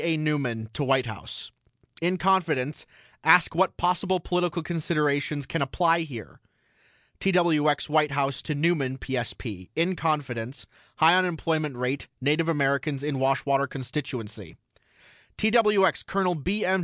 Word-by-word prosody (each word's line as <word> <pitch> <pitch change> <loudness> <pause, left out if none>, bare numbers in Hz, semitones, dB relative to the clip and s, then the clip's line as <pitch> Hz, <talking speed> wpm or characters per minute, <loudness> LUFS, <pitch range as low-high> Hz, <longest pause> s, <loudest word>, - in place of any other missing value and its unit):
A. 165 -1 +1
NEUMAN 140 -8 -1
TO 145 - -2
WHITE 135 -1 +2
HOUSE: 110 -3 -8 0.5
IN 180 +2 +1
CONFIDENCE 165 -7 0 0.4
ASK 165 +2 +6
WHAT 185 +2 +1
POSSIBLE 180 +1 +1
POLITICAL 175 -1 -1
CONSIDERATIONS 150 -3 -1
CAN 165 - -3
APPLY 165 +5 +2
HERE 120 -8 -10 0.8
TWX 165 -6 +2
WHITE 150 0 +3
HOUSE 140 -1 -1
TO 155 - -3
NEUMAN 145 -4 +1
PSP: 120 -7 -5
IN 175 +3 +1
CONFIDENCE 135 -6 -2 0.3
HIGH 160 +2 +6
UNEMPLOYMENT 160 -5 -1
RATE 125 +3 -2
NATIVE 150 +5 +1
AMERICANS 140 -1 0
IN 145 -2 -2
WASHWATER 135 +1 +1
CONSTITUENCY 120 - -6 0.8
TWX 210 -3 +3
COL. 190 -2 +1
B. 185 +7 -2
M. 190 +1 +2
150 Hz, 125 wpm, -26 LUFS, 135-175 Hz, 0.8 s, ASK